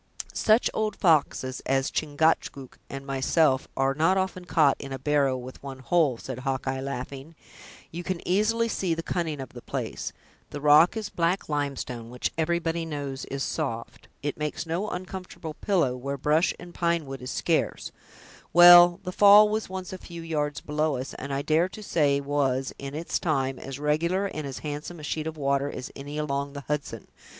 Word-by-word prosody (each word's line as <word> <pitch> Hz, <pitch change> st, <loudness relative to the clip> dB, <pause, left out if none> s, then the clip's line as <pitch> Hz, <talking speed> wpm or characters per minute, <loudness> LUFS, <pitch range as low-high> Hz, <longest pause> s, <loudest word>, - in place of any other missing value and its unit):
"Such 220 Hz, +2 st, +3 dB
old 215 Hz, -1 st, -1 dB
foxes 145 Hz, -7 st, +2 dB
as 135 Hz, 0 st, +1 dB
Chingachgook 145 Hz, -3 st, 0 dB
and 135 Hz, 0 st, -7 dB
myself 135 Hz, +1 st, +2 dB
are 135 Hz, 0 st, +2 dB
not 165 Hz, +6 st, +2 dB
often 185 Hz, -1 st, -2 dB
caught 155 Hz, -5 st, +4 dB
in 140 Hz, -, -7 dB
a 135 Hz, -, -3 dB
barrow 140 Hz, -1 st, +1 dB
with 130 Hz, +1 st, -9 dB
one 135 Hz, -1 st, -7 dB
hole," 135 Hz, -1 st, +2 dB
said 130 Hz, +1 st, -7 dB
Hawkeye, 130 Hz, 0 st, -2 dB
laughing; 140 Hz, +3 st, -6 dB, 0.6 s
"you 175 Hz, +2 st, -6 dB
can 185 Hz, -1 st, -3 dB
easily 215 Hz, +5 st, +2 dB
see 185 Hz, -6 st, -1 dB
the 165 Hz, -, -4 dB
cunning 160 Hz, -5 st, -2 dB
of 130 Hz, -3 st, -6 dB
the -, -, -11 dB
place—the 145 Hz, -, -7 dB
rock 150 Hz, +7 st, +6 dB
is 215 Hz, -2 st, -4 dB
black 175 Hz, 0 st, 0 dB
limestone, 135 Hz, -5 st, -3 dB
which 125 Hz, +1 st, -2 dB
everybody 165 Hz, 0 st, 0 dB
knows 145 Hz, -4 st, -5 dB
is 135 Hz, 0 st, -4 dB
soft; 115 Hz, -8 st, -4 dB, 0.2 s
it 145 Hz, -, -2 dB
makes 150 Hz, +2 st, -3 dB
no 175 Hz, +6 st, -2 dB
uncomfortable 180 Hz, -3 st, -6 dB
pillow, 170 Hz, -7 st, +1 dB
where 140 Hz, +2 st, -4 dB
brush 150 Hz, +6 st, +2 dB
and 175 Hz, 0 st, -11 dB
pine 170 Hz, -2 st, 0 dB
wood 135 Hz, -1 st, -7 dB
is 125 Hz, -, -6 dB
scarce; -, -, -1 dB, 0.6 s
well, 175 Hz, +1 st, +9 dB
the 180 Hz, -, -4 dB
fall 205 Hz, +2 st, +8 dB
was 215 Hz, -1 st, -2 dB
once 185 Hz, -1 st, -6 dB
a 185 Hz, -, -6 dB
few 170 Hz, -1 st, -9 dB
yards 150 Hz, -3 st, -2 dB
below 150 Hz, -1 st, 0 dB
us, 130 Hz, +2 st, -5 dB
and 140 Hz, +2 st, -7 dB
I 135 Hz, +1 st, -1 dB
dare 160 Hz, +4 st, +2 dB
to 215 Hz, -, -10 dB
say 145 Hz, -7 st, +2 dB
was, 140 Hz, -2 st, 0 dB
in 140 Hz, +1 st, -6 dB
its 165 Hz, +2 st, -2 dB
time, 135 Hz, -5 st, -1 dB
as 135 Hz, -1 st, -7 dB
regular 165 Hz, +6 st, +1 dB
and 155 Hz, -7 st, -4 dB
as 135 Hz, -, -6 dB
handsome 150 Hz, +3 st, -5 dB
a -, -, -10 dB
sheet 155 Hz, +1 st, -3 dB
of 160 Hz, 0 st, -5 dB
water 140 Hz, 0 st, 0 dB
as 125 Hz, -, -7 dB
any 145 Hz, +2 st, -7 dB
along 140 Hz, -2 st, -2 dB
the 140 Hz, -, -6 dB
Hudson. 150 Hz, +1 st, -4 dB
150 Hz, 180 wpm, -26 LUFS, 135-175 Hz, 0.6 s, well